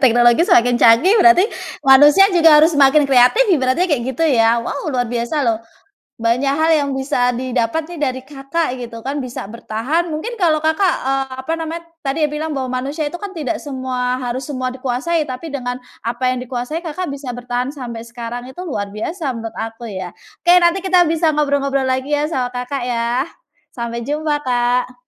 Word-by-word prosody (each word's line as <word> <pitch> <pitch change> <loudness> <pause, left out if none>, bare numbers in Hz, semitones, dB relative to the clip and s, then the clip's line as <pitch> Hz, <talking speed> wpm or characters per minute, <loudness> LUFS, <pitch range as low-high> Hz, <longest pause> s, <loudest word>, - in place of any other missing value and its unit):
teknologi 240 - +4
semakin 245 -7 +4
canggih 235 - +6
berarti 355 +1 +6 0.4
manusia 290 +8 +7
juga 325 -3 +6
harus 315 +3 +5
semakin 285 +1 +5
kreatif 270 - +5
ibaratnya 265 +3 +2
kayak 295 -9 0
gitu 330 - +1
ya. 230 -5 +3
Wow, 280 +5 -4
luar 250 -4 0
biasa 240 +5 -2
loh, 225 -1 0 0.6
banyak 250 +4 +1
hal 320 +2 +2
yang 285 -1 -1
bisa 250 -2 0
didapat 255 +5 -2
nih 345 - -8
dari 260 -3 -2
Kakak 275 +1 -3
gitu 235 -2 -8
kan, 275 +5 -4
bisa 245 -6 -6
bertahan 255 +10 -2
mungkin 450 +10 -5
kalau 315 -5 +2
Kakak, 320 +5 +1 0.2
eee, 270 0 0 0.2
apa 320 +5 -3
namanya 325 +1 -5 0.2
tadi 275 +4 -1
bilang 305 +1 -4
bahwa 260 -2 -3
manusia 290 +4 -3
itu 350 - -7
kan 400 0 -7
tidak 315 -1 -3
semua 255 -2 -3
harus 250 +1 -4
semua 255 -3 -3
dikuasai 265 +6 -2
tapi 260 +5 -6
dengan 250 -3 -4 0.2
apa 240 +2 -1
yang 255 - -1
dikuasai 250 +7 -5
Kakak 330 +1 -4
bisa 275 -3 -6
bertahan 245 +2 -3
sampai 235 -4 -7
sekarang, 240 +1 -7
itu 265 +8 -9
luar 205 - -4
biasa 280 - -3
menurut 225 -1 -7
aku 225 +1 -6
ya. 185 -3 -6 0.3
Oke, 350 - +6
nanti 350 +3 +2
kita 365 -1 +4
bisa 320 -1 +1
ngobrol-ngobrol 275 -2 0
lagi 260 +3 -1
ya 295 +1 0
sama 250 -5 -2
Kakak 250 +1 -4
ya. 240 +2 -1 0.5
Sampai 235 -1 -5
jumpa, 300 0 -1
Kak. 250 0 0
265 Hz, 180 wpm, -18 LUFS, 245-310 Hz, 0.6 s, manusia